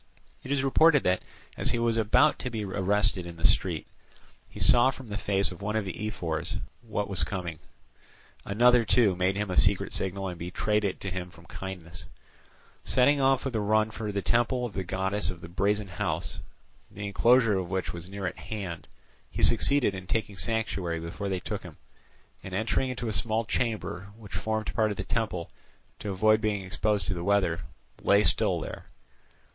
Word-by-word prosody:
It 130 - -7
is 140 -2 +1
reported 145 +2 +5
that, 90 0 +2 0.3
as - - +1
he - - 0
was 115 -1 +1
about 115 +7 +3
to 125 - -3
be 110 -3 -4
arrested 100 -1 +2
in 85 - -8
the 80 - -2
street, - - +2 0.6
he - - -11
saw 120 +1 +6
from 130 -3 -7
the 100 - -4
face 100 -2 +2
of 90 - -10
one 105 +2 -2
of 110 -2 0
the 105 +3 -4
ephors 85 -5 -3 0.2
what 105 -3 -3
he - - -13
was 95 - +3
coming 85 -6 -4
for; - - -24
another, 120 +3 +5
too, 110 -2 +3
made 90 +2 +1
him 105 -1 -2
a - - -2
secret 100 -1 +3
signal, 95 +1 -2
and 90 -2 -6
betrayed 105 +5 -1
it 95 -2 -2
to 95 - -4
him 90 0 -4
from 85 -1 -17
kindness. 90 -2 -8 0.8
Setting 140 +3 +3
off 135 0 +3
with 130 -3 -2
a - - +1
run 110 +1 +2
for 110 -2 -4
the 100 -1 -2
temple 120 +1 +1
of 115 - -6
the 95 - -3
goddess 95 +1 -1
of 90 -2 -6
the - - -9
Brazen 100 +4 0
House, 90 +1 -3 0.5
the 100 +1 -7
enclosure 115 0 +4
of 90 -2 -5
which 95 -1 -2
was 85 +1 -8
near 100 0 -5
at 90 - -4
hand, 95 -6 -6 0.4
he - - -4
succeeded 125 -1 +5
in 95 -1 -8
taking 105 -1 -1
sanctuary 95 -6 -1
before 85 +5 -5
they 95 -1 -1
took - - -5
him, - - -12 0.7
and 95 -1 -6
entering 115 +5 0
into 125 -2 -4
a 110 - -2
small 110 +1 0
chamber, 105 -5 -2
which 105 -4 -12
formed 110 -1 -2
part 110 -1 +2
of 105 - -4
the 95 - -3
temple, 95 -6 -2 0.5
to 105 - -5
avoid 110 +3 +3
being 105 -3 -1
exposed 100 0 0
to 95 - -1
the 85 -2 -5
weather, 95 -4 +2 0.4
lay 100 +1 +4
still - - +2
there. - - -7
100 Hz, 195 wpm, -28 LUFS, 95-110 Hz, 0.8 s, saw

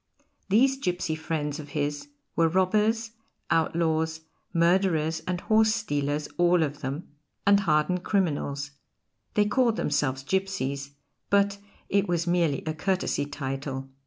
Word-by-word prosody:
These 260 +7 +4
gipsy 180 -9 -1
friends 155 -1 -3
of 145 -1 -8
his 145 - -2 0.3
were 165 - +4
robbers, 210 +6 +2 0.4
outlaws, 160 -1 +1 0.3
murderers 170 -2 +2
and 180 -1 -1
horse 220 0 +3
stealers 145 -8 -1
all 175 -1 +4
of 145 -1 -3
them, 140 +5 -4 0.4
and 200 0 +6
hardened 170 0 +1
criminals; 145 -7 -1 0.6
they 210 - +4
called 235 +1 +2
themselves 135 - 0
gipsies, 140 -6 -2 0.3
but 200 0 +2 0.3
it 200 0 +2
was 170 -1 0
merely 170 -5 +1
a 155 - -1
courtesy 180 -3 -1
title. 135 -1 -5
165 Hz, 125 wpm, -27 LUFS, 145-195 Hz, 0.6 s, and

